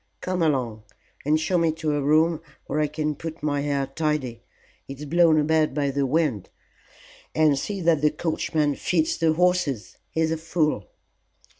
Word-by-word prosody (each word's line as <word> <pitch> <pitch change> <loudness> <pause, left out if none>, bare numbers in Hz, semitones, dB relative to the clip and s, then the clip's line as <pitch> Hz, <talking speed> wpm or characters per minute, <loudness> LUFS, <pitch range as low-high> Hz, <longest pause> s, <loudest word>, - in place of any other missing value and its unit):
Come 185 -1 -2
along 125 -9 0 0.4
and 155 +1 +3
show 175 +3 +1
me 165 -1 +2
to 160 -1 -2
a 145 - 0
room 155 +3 +3 0.2
where 150 - -2
I 150 - +2
can 150 +1 -2
put 160 +2 -8
my 145 -1 0
hair 140 -1 0
tidy; 135 -5 -2 0.5
it's 140 +2 -7
blown 165 0 +4
about 155 -1 +2
by 140 -2 0
the 140 0 0
wind. 140 - 0 0.9
And 155 -2 +4
see 200 +3 -4
that 165 -3 +3
the 150 - +4
coachman 155 -2 -1
feeds 160 +2 0
the 165 -1 +3
horses. 170 - 0
He's 160 0 0
a 160 - 0
fool." 155 - -1
155 Hz, 165 wpm, -24 LUFS, 140-160 Hz, 0.9 s, blown